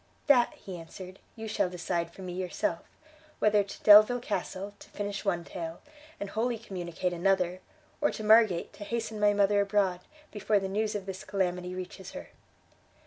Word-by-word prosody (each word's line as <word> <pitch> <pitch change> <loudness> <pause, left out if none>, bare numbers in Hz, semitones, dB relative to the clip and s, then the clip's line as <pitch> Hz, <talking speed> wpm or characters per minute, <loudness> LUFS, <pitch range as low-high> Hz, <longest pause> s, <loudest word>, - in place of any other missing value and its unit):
"That;" 250 -5 +5
he 185 -2 -8
answered, 185 +3 -10 0.2
"you 225 -1 -6
shall 210 -3 0
decide 170 -1 -2
for 190 - -11
me 180 -1 -5
yourself: 180 -2 -2 0.6
whether 210 -1 +4
to 200 - -11
Delvile 215 +4 +8
Castle, 205 -3 -4
to - - -14
finish 205 0 -4
one 175 -4 0
tale, 165 -2 -6 0.4
and 200 -1 -5
wholly 235 +2 0
communicate 180 -4 -4
another, 180 0 +1 0.4
or 295 - +4
to 215 - -6
Margate, 215 -5 +4
to 205 - -9
hasten 225 0 -3
my 205 0 +4
mother 200 0 +4
abroad, 200 -3 +1 0.3
before 210 0 +1
the 195 -1 -1
news 210 +2 -1
of 200 -2 -4
this 190 -1 -6
calamity 180 -2 -2
reaches 185 +1 -8
her." - - -8
195 Hz, 170 wpm, -29 LUFS, 180-210 Hz, 0.6 s, Delvile